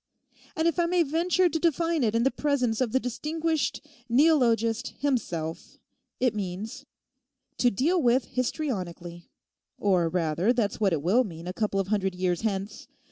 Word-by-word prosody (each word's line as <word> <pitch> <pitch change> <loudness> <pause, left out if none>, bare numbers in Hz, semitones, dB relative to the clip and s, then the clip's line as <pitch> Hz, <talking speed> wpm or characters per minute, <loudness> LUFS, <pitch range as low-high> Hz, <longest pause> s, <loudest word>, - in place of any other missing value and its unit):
And 320 +1 +1
if 335 +1 0
I 340 - +3
may 350 0 +3
venture 345 +5 +2
to 320 -1 -1
define 335 -1 +1
it 220 -1 +1
in 230 - +2
the 270 - +3
presence 260 -6 0
of 245 -4 0
the 260 - +2
distinguished 305 +4 -2 0.2
neologist 240 -4 +2
himself, 175 - -3 0.4
it 250 -3 +2
means, 215 +7 -5 0.7
"To 245 - +4
deal 320 - +1
with 245 -1 +3
histrionically"; 185 - -4 0.5
or, 180 -5 +2
rather, 170 +5 +1
that's 225 -5 -1
what 200 -3 +2
it 155 -4 -1
will 215 +10 +4
mean 170 -6 -8
a 180 - -4
couple 205 -1 -1
of 195 -1 -2
hundred 195 -3 0
years 180 -1 -1
hence. 205 -1 -3
235 Hz, 160 wpm, -27 LUFS, 190-290 Hz, 0.7 s, To